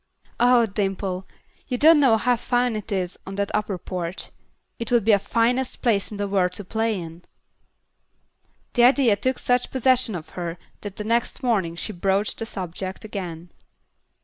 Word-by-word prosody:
Ah, 245 -1 +5
Dimple, 195 -2 -2 0.4
you 250 - -1
don't 315 +3 +7
know 255 -6 +5
how 245 +3 +2
fine 245 0 0
it 215 0 -6
is 185 -2 -2
on 195 - -6
that 200 0 -1
upper 210 -2 -1
porch. 175 0 -4 0.5
It 230 0 -4
would 235 -4 +3
be 225 - +5
the 200 - +5
finest 245 +5 0
place 210 -5 +2
in 210 - -7
the 205 0 -1
world 185 -2 +1
to 205 - -5
play 220 0 -1
in." 165 0 -9 1.5
The 240 -1 +5
idea 255 -4 +5
took 255 +6 -1
such 245 0 +1
possession 255 -4 +2
of 160 -3 -7
her 175 -1 -5 0.2
that 205 -2 -7
the 210 - -4
next 235 +4 -1
morning 195 -9 +1
she 210 +5 -4
broached 195 +3 0
the 225 - -3
subject 185 +1 -5
again. 175 -5 -6
210 Hz, 175 wpm, -24 LUFS, 190-240 Hz, 1.5 s, don't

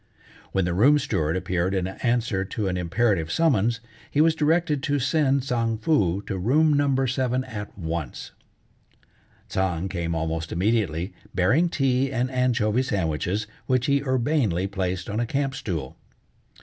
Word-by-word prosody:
When 95 -2 +1
the 85 - -1
room 135 +11 +5
steward 85 - 0
appeared 95 0 -1
in 95 -2 0
answer 115 -1 -1
to 105 +1 -3
an 90 - -1
imperative 90 -1 0
summons, 120 -8 +2 0.3
he 145 - -1
was 160 +1 +5
directed 160 -1 +1
to 145 +2 0
send 140 0 +2
Tsang 115 -3 0
Foo 100 - +1
to 100 -2 -4
room 150 - +3
No. 140 -2 +2
7 130 0 0
at 105 -5 -8
once. 80 -6 -5 1.2
Tsang 95 -2 -1
came 85 -3 -2
almost 80 0 -2
immediately, 95 -2 0 0.2
bearing 130 - +3
tea 135 -2 +1
and 130 0 -1
anchovy 125 -3 +1
sandwiches, 95 - -1 0.2
which 130 -1 +2
he 140 -1 +2
urbanely 130 - +1
placed 95 -2 -3
on 105 +2 -2
a 120 - 0
camp 135 +2 -1
stool. 85 - -4
115 Hz, 150 wpm, -25 LUFS, 90-135 Hz, 1.2 s, room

